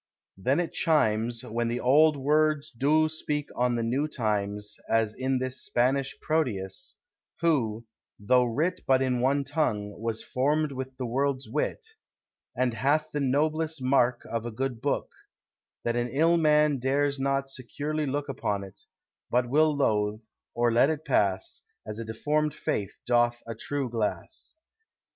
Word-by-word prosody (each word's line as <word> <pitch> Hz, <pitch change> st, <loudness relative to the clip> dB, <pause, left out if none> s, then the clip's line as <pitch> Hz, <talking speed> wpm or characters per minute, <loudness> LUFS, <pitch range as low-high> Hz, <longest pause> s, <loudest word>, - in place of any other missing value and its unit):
Then 130 Hz, -, +1 dB
it 175 Hz, -, -2 dB
chimes, 115 Hz, -7 st, +1 dB
When 115 Hz, +1 st, -2 dB
the 120 Hz, +1 st, -1 dB
old 150 Hz, +4 st, +5 dB
words 150 Hz, +1 st, +1 dB
doe 150 Hz, +5 st, +3 dB
strike 150 Hz, -2 st, -3 dB
on 125 Hz, 0 st, +1 dB
the 115 Hz, -, -1 dB
new 130 Hz, +6 st, 0 dB
times, 105 Hz, -5 st, -2 dB
As 110 Hz, -1 st, +2 dB
in 130 Hz, +2 st, 0 dB
this 130 Hz, 0 st, -3 dB
Spanish 135 Hz, +3 st, 0 dB
Proteus; 145 Hz, -, -2 dB, 0.4 s
who, 120 Hz, -9 st, +1 dB, 0.3 s
though 125 Hz, +5 st, +3 dB
writ 155 Hz, +10 st, -1 dB
But 130 Hz, 0 st, +4 dB
in 125 Hz, -2 st, 0 dB
one 140 Hz, +3 st, +2 dB
tongue, 130 Hz, -8 st, -1 dB
was 115 Hz, -1 st, -2 dB
formed 150 Hz, +3 st, 0 dB
with 130 Hz, -1 st, -6 dB
the 130 Hz, -, -3 dB
world's 135 Hz, +2 st, -1 dB
wit: 150 Hz, -, -2 dB, 0.7 s
And 125 Hz, -1 st, +1 dB
hath 150 Hz, +6 st, +1 dB
the 150 Hz, -, -2 dB
noblest 155 Hz, +3 st, 0 dB
marke 130 Hz, -2 st, +2 dB
of 115 Hz, -1 st, -3 dB
a 120 Hz, -, -4 dB
good 125 Hz, 0 st, -3 dB
booke, 140 Hz, +1 st, -1 dB, 0.7 s
That 120 Hz, 0 st, 0 dB
an 120 Hz, 0 st, 0 dB
ill 165 Hz, +6 st, +3 dB
man 150 Hz, -3 st, +3 dB
dares 140 Hz, +2 st, +1 dB
not 135 Hz, 0 st, 0 dB
securely 145 Hz, +4 st, -3 dB
looke 145 Hz, +2 st, -2 dB
Upon 105 Hz, -7 st, -2 dB
it, 95 Hz, -, -12 dB, 0.5 s
but 125 Hz, 0 st, +2 dB
will 150 Hz, +2 st, +3 dB
loath, 105 Hz, -5 st, +1 dB, 0.4 s
or 120 Hz, 0 st, +2 dB
let 120 Hz, +5 st, +4 dB
it 155 Hz, 0 st, -3 dB
passe, 100 Hz, -9 st, 0 dB, 0.2 s
As 110 Hz, +1 st, -6 dB
a 115 Hz, -, -4 dB
deformed 150 Hz, +7 st, -1 dB
face 100 Hz, -3 st, -3 dB
doth 120 Hz, -1 st, +2 dB
a 115 Hz, -, -5 dB
true 140 Hz, +4 st, -3 dB
glasse. 115 Hz, -, -4 dB
130 Hz, 155 wpm, -27 LUFS, 115-150 Hz, 0.7 s, old